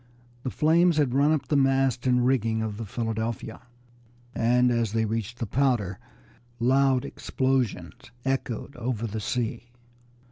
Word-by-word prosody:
The 130 - -3
flames 165 +4 +3
had 140 -5 +2
run 140 +3 +4
up 155 -3 0
the 150 - +1
mast 135 -2 +2
and 125 -1 +3
rigging 115 -4 +1
of 105 -2 -4
the 115 -1 -6
Philadelphia, 115 +1 -3 0.7
and 125 +1 +3
as 115 -3 0
they 110 0 +1
reached 115 +1 -3
the 115 - -3
powder 115 -5 0 0.6
loud 130 +1 +3
explosions 125 -9 -2 0.2
echoed 135 0 -2
over 120 -2 -2
the 110 0 -4
sea. 120 +2 -3
120 Hz, 140 wpm, -26 LUFS, 115-135 Hz, 0.7 s, run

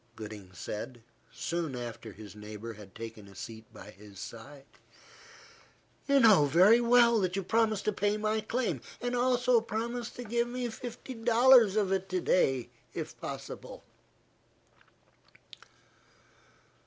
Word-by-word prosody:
Gooding 105 -3 -9
said, 110 +6 -6 0.3
soon 165 -5 -3
after 120 -2 -7
his 105 -1 -12
neighbour 105 +2 -8
had 105 -2 -14
taken 115 -2 -8
a 100 - -15
seat 110 +3 -9
by 105 - -12
his 100 0 -14
side. 135 +7 -10 1.4
"You 280 -1 +5
know 215 - +7
very 190 - +6
well 235 -1 +5
that 185 -2 -1
you 195 - -1
promised 220 +1 +1
to 215 - +1
pay 205 +1 0
my 215 +1 0
claim; 235 +3 -2 0.2
and 245 0 -2
also 245 -1 +3
promised 235 +2 -4
to 245 - -6
give 235 +1 0
me 245 0 -3
fifty 245 +3 -8
dollars 235 -2 +5
of 205 -3 +1
it 190 0 -1
to 185 0 0
day, 135 -8 +1 0.3
if - - -5
possible." - - -7
195 Hz, 135 wpm, -30 LUFS, -, 1.4 s, know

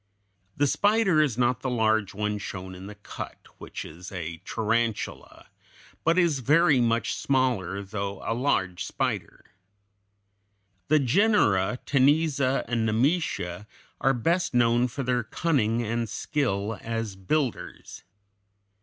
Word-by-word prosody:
The 145 - +3
spider 200 +1 +3
is 135 -7 0
not 125 -1 +2
the 130 - -2
large 110 -4 +1
one 105 0 -2
shown 95 -2 -6
in 95 +1 -9
the 105 - -9
cut, 100 - -9
which - - -7
is 85 +4 -10
a 85 -3 -5
tarantula, 115 0 -2 0.5
but 165 +2 +3
is 170 -6 +3
very 150 +2 +4
much 115 0 +1
smaller, 120 -8 0
though 100 0 -4
a - - 0
large 95 -8 0
spider. - - -3 1.4
The 155 - +4
genera, 125 - +3
Cteniza 140 -1 +2
and 115 -2 0
Nemesia, 110 - 0 0.3
are 135 - +3
best 170 +6 0
known 120 +1 +3
for 135 +3 -5
their 125 -1 +1
cunning 120 -4 0
and 115 0 -2
skill 110 - -2
as 115 -3 -3
builders. 125 +7 -3
120 Hz, 125 wpm, -26 LUFS, 105-140 Hz, 1.4 s, very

